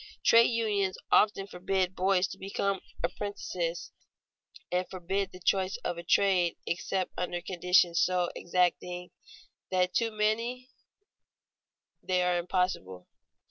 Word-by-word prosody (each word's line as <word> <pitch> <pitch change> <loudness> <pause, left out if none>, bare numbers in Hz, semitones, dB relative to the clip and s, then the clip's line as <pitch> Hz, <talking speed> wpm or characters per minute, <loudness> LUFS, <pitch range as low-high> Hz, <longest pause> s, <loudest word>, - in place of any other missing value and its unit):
Trade 230 0 +7
unions 210 -5 0
often 205 -2 +4
forbid 185 0 -1
boys 190 0 +2
to - - -9
become 195 0 -1 0.2
apprentices, 175 -4 -3 0.8
and 180 +1 0
forbid 190 +1 -2
the 180 - -11
choice 190 +1 +1
of 170 - -2
a - - -7
trade 180 -1 +3
except 185 +1 -2
under 175 -1 -2
conditions 180 -1 +2
so 180 -1 +1
exacting 180 0 -1 0.6
that 185 -1 +1
to 230 -1 +1
many 230 +4 -1 1.3
they 180 -1 +1
are 180 -1 +2
impossible. 170 - -2
185 Hz, 115 wpm, -29 LUFS, 180-195 Hz, 1.3 s, Trade